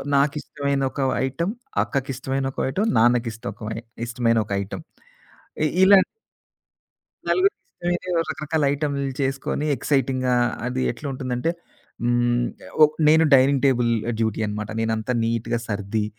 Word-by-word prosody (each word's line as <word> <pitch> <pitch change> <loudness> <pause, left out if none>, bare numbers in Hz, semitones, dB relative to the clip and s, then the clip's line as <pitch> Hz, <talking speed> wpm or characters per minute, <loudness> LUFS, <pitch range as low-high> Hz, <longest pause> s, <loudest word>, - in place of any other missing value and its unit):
నాకిష్టమైన 140 0 0
ఒక - - -4 0.2
ఐటమ్, 170 +9 -2 0.3
అక్కకిష్టమైన 135 0 -2
ఒక - - -7
ఐటమ్, 205 +11 0
నాన్నకిష్టకమై 115 -2 0 0.3
ఇష్టమైన 115 -1 +1
ఒక 100 - -13
ఐటమ్. 95 - -7 0.8
ఇ - - +4 0.2
ఇలాన్ 190 0 +7 1.2
నలుగురికి 390 +2 +3
ఇష్టమైనవి 175 +1 -3
ఓ - - +4
రకరకాల 155 0 -1
ఐటమ్లు 140 -2 -2
చేసుకొని, 135 +2 -1
ఎక్సైటింగా 130 -3 +1 0.3
అది 125 +1 -2
ఎట్లా 120 +5 -9
ఉంటుందంటే, 130 +3 -2 0.5
హ్మ్. 120 0 +2 0.2
ఆహ్, - - -13
ఒక్ 150 0 +1
నేను 160 +1 +6
డైనింగ్ 135 +1 +4
టేబుల్ 120 -3 +2 0.3
డ్యూటీ 110 -1 0
అనమాట. 105 0 -4
నేనంతా 110 +2 -1
నీటుగా 115 +1 -1
సర్ది, 105 +1 -2
130 Hz, 120 wpm, -23 LUFS, 115-145 Hz, 1.2 s, ఇలాన్